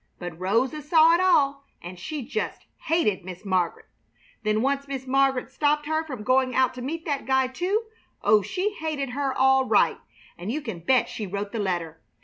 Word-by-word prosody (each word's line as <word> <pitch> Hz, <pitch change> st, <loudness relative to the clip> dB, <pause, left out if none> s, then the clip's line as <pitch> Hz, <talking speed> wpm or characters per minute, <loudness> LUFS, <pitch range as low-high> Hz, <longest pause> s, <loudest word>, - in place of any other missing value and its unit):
But 175 Hz, -2 st, -7 dB
Rosa 235 Hz, +11 st, 0 dB
saw 320 Hz, +2 st, +5 dB
it 340 Hz, -, +3 dB
all, 280 Hz, -7 st, +3 dB, 0.2 s
and 175 Hz, +1 st, -9 dB
she 295 Hz, -, -5 dB
just 250 Hz, -, -4 dB, 0.2 s
hated 305 Hz, -, +1 dB
Miss 180 Hz, +1 st, -9 dB
Mar'get. 185 Hz, -3 st, 0 dB, 0.6 s
Then 215 Hz, +1 st, +1 dB
once 280 Hz, +1 st, 0 dB
Miss 270 Hz, -2 st, -5 dB
Mar'get 270 Hz, -1 st, +1 dB
stopped 295 Hz, +1 st, +1 dB
her 315 Hz, +1 st, 0 dB
from 260 Hz, -9 st, -7 dB
going 255 Hz, +1 st, +2 dB
out 260 Hz, -1 st, +3 dB
to 255 Hz, -, -8 dB
meet 320 Hz, +6 st, -4 dB
that 285 Hz, -4 st, -2 dB
guy, 265 Hz, 0 st, +3 dB
too. 360 Hz, -, -1 dB, 0.4 s
Oh, 210 Hz, 0 st, +5 dB
she 365 Hz, -, -2 dB
hated 305 Hz, -7 st, -3 dB
her, 275 Hz, +1 st, -1 dB
all 265 Hz, 0 st, +3 dB
right! -, -, +3 dB, 0.4 s
And 185 Hz, +5 st, -4 dB
you 295 Hz, -, -1 dB
can 225 Hz, -10 st, -6 dB
bet 250 Hz, +9 st, +2 dB
she 210 Hz, -, -5 dB
wrote 200 Hz, +2 st, -4 dB
the 230 Hz, -, -3 dB
letter! 175 Hz, -5 st, -2 dB
265 Hz, 190 wpm, -25 LUFS, 210-295 Hz, 0.6 s, saw